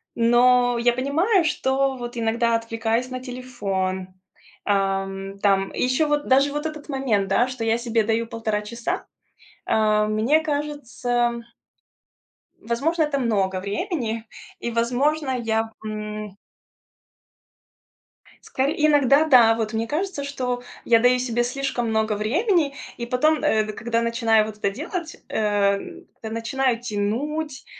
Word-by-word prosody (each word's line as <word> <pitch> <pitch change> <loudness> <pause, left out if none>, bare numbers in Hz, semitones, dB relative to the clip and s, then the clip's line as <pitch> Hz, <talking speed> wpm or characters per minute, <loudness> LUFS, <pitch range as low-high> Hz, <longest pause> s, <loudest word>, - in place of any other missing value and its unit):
но 245 +1 +4
я 240 0 +3
понимаю, 330 - +2
что 270 -2 +1
вот 240 0 -7
иногда 230 0 +1
отвлекаюсь 230 +2 -1
на 255 0 -4
телефон, 200 -8 -3 0.6
ам, 195 -1 -1
там 195 -1 +2
и - - -4
ещё 255 +5 +2
вот 295 0 0
даже 275 +2 +4
вот 295 +2 -3
этот 305 -1 -6
момент, 250 -8 0
да, 235 +6 +3
что 255 -2 -5
я 225 0 +2
себе 235 -2 0
даю 225 +1 0
1,5 220 -2 -2
часа, 230 +3 -4 0.6
э, 215 -1 +3
мне 220 +9 +2
кажется 245 -6 -1 1.2
возможно, 310 +9 0
это 295 -2 -1
много 195 -6 0
времени 225 - -3 0.3
и, 235 - -3
возможно, 265 +5 +1
я, 225 -2 -1
м 210 -1 -6 2.1
Скоре 270 +3 -1
иногда 290 0 +5
да, 245 -7 +6
вот 225 -1 -3
мне 225 +1 -1
кажется, 330 +4 -3
что 250 -3 -3 0.2
я 230 -1 +5
даю 245 +1 +4
себе 240 -1 0
слишком 250 -2 -2
много 220 -1 +1
времени 295 - +1 0.2
и 235 - -5
потом, 305 +6 +1
э, 220 -7 +3
д 215 - -6
когда 230 +2 -1
начинаю 230 -2 +2
вот 215 -1 -8
это 200 - +1
делать, 325 - -5
эм, 205 -2 0
как-то 220 - -8
начинаю 235 +2 0
тянуть, 265 +7 -3
235 Hz, 135 wpm, -23 LUFS, 220-275 Hz, 2.1 s, да